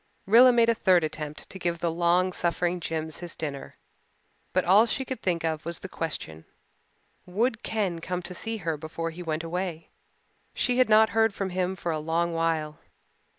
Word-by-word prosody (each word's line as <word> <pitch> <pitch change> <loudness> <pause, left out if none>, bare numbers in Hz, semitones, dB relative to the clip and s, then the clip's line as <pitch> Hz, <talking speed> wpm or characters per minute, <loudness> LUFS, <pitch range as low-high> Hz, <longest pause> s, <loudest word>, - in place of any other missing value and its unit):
Rilla 240 +5 +8
made 235 -1 +4
a 230 - +4
third 185 -6 +3
attempt 150 -1 -5
to 190 - -8
give 175 -1 -1
the 170 0 -1
long 175 +2 +2
suffering 175 +1 0
Jims 160 -2 -4
his 175 -2 -6
dinner, 145 -3 -6 0.7
but 185 -1 +1
all 200 +6 +6
she 265 +2 -1
could 260 0 -5
think 170 -3 0
of 160 -1 -2
was 170 0 -4
the - - -8
question 115 - -5 0.8
Would 225 +5 0
Ken 200 -6 -1
come 180 +2 -4
to 180 - -7
see 225 +5 -4
her 165 -5 -2
before 165 +2 -4
he 170 +2 -9
went 160 -1 -3
away? 170 -1 -4 0.7
She 250 0 +1
had 255 - +4
not 220 0 +6
heard 225 -2 +2
from 195 -2 -3
him 185 +1 -1
for 175 -2 -3
a 155 - -1
long 165 +2 0
while. 160 -2 -1
175 Hz, 190 wpm, -27 LUFS, 165-195 Hz, 0.8 s, Rilla